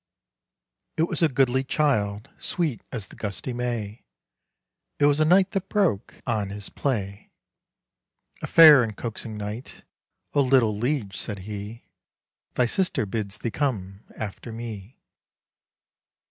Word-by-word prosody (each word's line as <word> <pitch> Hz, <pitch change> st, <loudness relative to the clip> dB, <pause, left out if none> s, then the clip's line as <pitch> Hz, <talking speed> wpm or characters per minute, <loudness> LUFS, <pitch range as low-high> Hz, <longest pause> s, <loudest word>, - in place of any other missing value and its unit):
_" -, -, -63 dB, 0.9 s
It 160 Hz, +1 st, +2 dB
was -, -, -2 dB
a 165 Hz, -, +5 dB
goodly 130 Hz, -1 st, +2 dB
child, 110 Hz, -8 st, 0 dB
Sweet 160 Hz, -, -2 dB
as 110 Hz, -6 st, -5 dB
the -, -, -13 dB
gusty 105 Hz, +4 st, -4 dB
May; 120 Hz, -3 st, -3 dB, 0.9 s
It 145 Hz, -, +3 dB
was 145 Hz, 0 st, +4 dB
a 155 Hz, -, +4 dB
knight 185 Hz, +4 st, +4 dB
that 195 Hz, -1 st, -3 dB
broke 190 Hz, -, 0 dB
On 110 Hz, -5 st, -1 dB
his 100 Hz, 0 st, -7 dB
play, 100 Hz, -7 st, -3 dB, 1.1 s
A -, -, -3 dB
fair 155 Hz, -5 st, +9 dB
and 110 Hz, -4 st, -3 dB
coaxing 110 Hz, -1 st, -5 dB
knight: 105 Hz, +4 st, -7 dB, 0.5 s
"O 145 Hz, -, +4 dB
little 125 Hz, -5 st, +3 dB
liege!" 115 Hz, -3 st, -1 dB
said 100 Hz, 0 st, -4 dB
he, 105 Hz, +2 st, -7 dB, 0.7 s
"Thy 125 Hz, -, +2 dB
sister 180 Hz, -, 0 dB
bids 100 Hz, -1 st, -3 dB
thee 115 Hz, -, -3 dB
come 100 Hz, -10 st, -2 dB, 0.2 s
After 110 Hz, +2 st, -6 dB
me. 110 Hz, 0 st, -8 dB
115 Hz, 135 wpm, -25 LUFS, 105-140 Hz, 1.1 s, fair